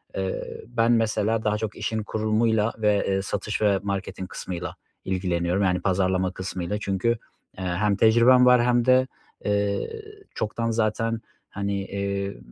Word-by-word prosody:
eee, 95 -1 -2 0.2
ben 120 0 +2
mesela 110 -1 +1
daha 105 0 +1
çok 105 -1 -4
işin 110 -1 -2
kurulumuyla 110 +1 +1
ve, 105 -2 +2
eee, 95 0 +1
satış 105 +2 -3
ve 100 -2 +3
marketing 100 -2 -4
kısmıyla 90 -1 -5 0.3
ilgileniyorum, 90 0 0
yani, 90 -1 +1
pazarlama 95 -1 +1
kısmıyla 95 +1 -4
çünkü, 95 +3 0 0.5
eee, 95 - -5
hem 100 +3 +1
tecrübem 120 +4 +6
var 125 -1 +6
hem 120 -1 +3
de, 130 0 +5 0.4
eee, 105 - -1 0.3
çoktan 115 +2 -2
zaten, 115 0 0 0.3
hani, 100 -1 -3
iii, 100 -3 -3
105 Hz, 140 wpm, -25 LUFS, 95-115 Hz, 0.5 s, tecrübem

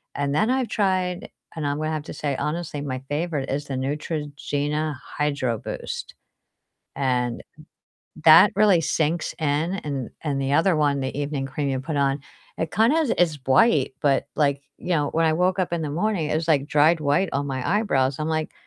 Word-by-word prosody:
and 145 0 -1
then 215 +8 +2
I've 260 -1 +1
tried 185 -4 -1 0.3
and 155 -2 -3
I'm 145 - -1
gonna 155 0 -1
have 155 -1 -3
to - - -8
say 140 -3 -2
honestly 150 -2 -3
my 130 -3 -3
favorite 150 -2 -2
is 145 +2 -2
the 135 - -4
Neutrogena 145 +1 -2 0.2
Hydro 140 -5 0
Boost, - - -6 0.8
and 125 -3 0 0.8
that 165 +5 +8
really 205 -5 +5
sinks 160 +2 0
in 155 +4 0
and 140 -4 -4
and 140 -3 -1
the 135 0 -1
other 165 +4 +3
one, 145 -2 +2
the 130 +1 -4
evening 145 -1 -2
cream 140 +1 -3
you 130 - -1
put 150 +3 -4
on, 140 0 +1 0.4
it 165 -1 -2
kind 225 +7 +3
of 320 -7 +1
is 170 -4 +3
bright 135 - +3
but 140 -2 +2
like, 140 -2 +1 0.2
you - - -7
know, 150 -4 +2
when 165 0 +2
I 160 - +3
woke 180 +3 +1
up 185 -2 -1
in 170 -1 -1
the 150 - -3
morning 170 -1 -1
it - - 0
was 160 0 -2
like 145 -3 +3
dried 155 +3 +3
white 150 +5 +1
on 140 +1 -1
my 130 -2 -3
eyebrows. 140 -11 +1
I'm 155 - -1
like, 155 -1 -2
150 Hz, 195 wpm, -24 LUFS, 140-170 Hz, 0.8 s, that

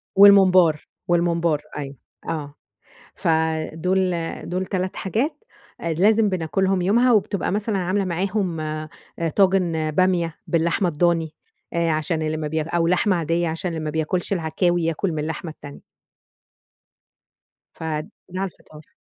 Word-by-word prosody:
والممبار، 185 -5 +6 0.2
والممبار 170 -3 +1 0.2
أيوه، 140 -1 -5 0.3
آه. 145 -3 -4 0.6
ف - - -4 0.5
دول 185 +3 +1 0.4
دول 185 +1 -1
3 185 -1 -2
حاجات 245 - -2 0.4
آآ 170 -1 -1
لازم 210 +5 +4
بناكلهم 185 +2 0
يومها، 235 +7 +3
وبتبقى 205 -3 +1
مثلًا 210 +1 0
عاملة 190 +2 0
معاهم 185 0 -1
آآ 155 0 -4 0.5
طاجن 180 -5 +2
بامية 175 -1 +1
باللحمة 170 +3 +1
الضاني، 165 0 +1 0.4
آآ 170 -1 +1
عشان 155 +1 -1
اللي 155 0 -1
ما 155 -1 -3
ب- 150 - -8 0.2
أو 170 -1 +2
لحمة 185 +2 +2
عاديّة- 170 +1 0
عشان 165 +3 -3
اللي 165 -1 -4
ما - - -1
بياكلش 160 +5 -1
العكاوي 175 0 0
ياكل 165 +3 -1
من 155 - -3
اللحمة 160 +2 -4
التانية. 145 -2 -12 1.9
ف - - -10 0.5
ده 185 +1 -5
على 195 - 0
الفطار. 155 -2 -17
175 Hz, 135 wpm, -22 LUFS, 160-190 Hz, 1.9 s, والممبار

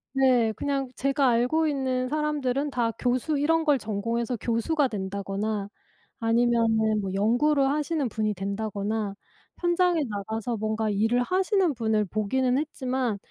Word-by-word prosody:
네. 250 -4 +4
그냥 275 -1 -2
제가 275 0 +1
알고 250 +7 +2
있는 260 -3 -1
사람들은 295 -2 -1
다 235 -3 0
교수 255 +4 0
이런 325 +2 +2
걸 290 -3 +3
전공해서 230 +3 -2
교수가 265 +5 +1
된다거나 200 0 -3 0.5
아니면은 225 -2 +2
뭐 190 -1 -3
연구를 270 +7 +3
하시는 300 -1 0
분이 215 -1 -1
된다거나 200 +1 -3 0.4
현장에 350 -1 +2
나가서 220 +3 -3
뭔가 220 0 -1
일을 225 +5 +2
하시는 375 - +1
분을 220 -3 0
보기는 250 +6 0
했지만 255 -7 -2
245 Hz, 305 characters per minute, -26 LUFS, 215-280 Hz, 0.5 s, 네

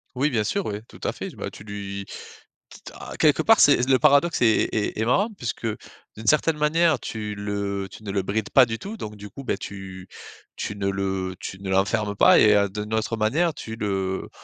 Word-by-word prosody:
Oui, 140 +4 +1
bien 110 -6 0
sûr, 200 - -1
oui, 105 +1 -4
tout - - -15
à - - 0
fait. - - -6
Bah, - - -6
tu - - -12
lui 100 -1 -6 0.6
quitte - - -12
à - - -8
quelque - - +4
part - - +5
c'est 125 - +5
le 130 -1 +5
paradoxe 150 +3 +3
est 110 -2 +4
est 110 0 -1
est 110 - +1
marrant 200 - +2
puisque 120 -1 -5 0.5
d'une 110 - -9
certaine 155 0 +3
manière 155 -1 +2
tu 105 -2 -5
le 100 -1 -3
tu 110 - -13
ne 100 - -4
le 100 -1 0
brides 105 +2 -2
pas 130 -2 +6
du 115 0 -3
tout, 215 - -7
donc 105 - -7
du 105 0 -10
coup, 135 - -9
beh 110 - -1
tu 95 -3 -8 0.5
tu 105 - -4
ne 100 -1 -1
le 95 -1 -2
tu 95 - -7
ne 95 -1 -6
l'enfermes 100 +2 +1
pas - - +6
et 105 -1 +6
heu, 100 -1 +3
d'une 105 +2 -5
autre 110 +1 -1
manière 155 +11 +1
tu 110 - -7
le 95 -3 -2
105 Hz, 220 wpm, -24 LUFS, 100-125 Hz, 0.6 s, pas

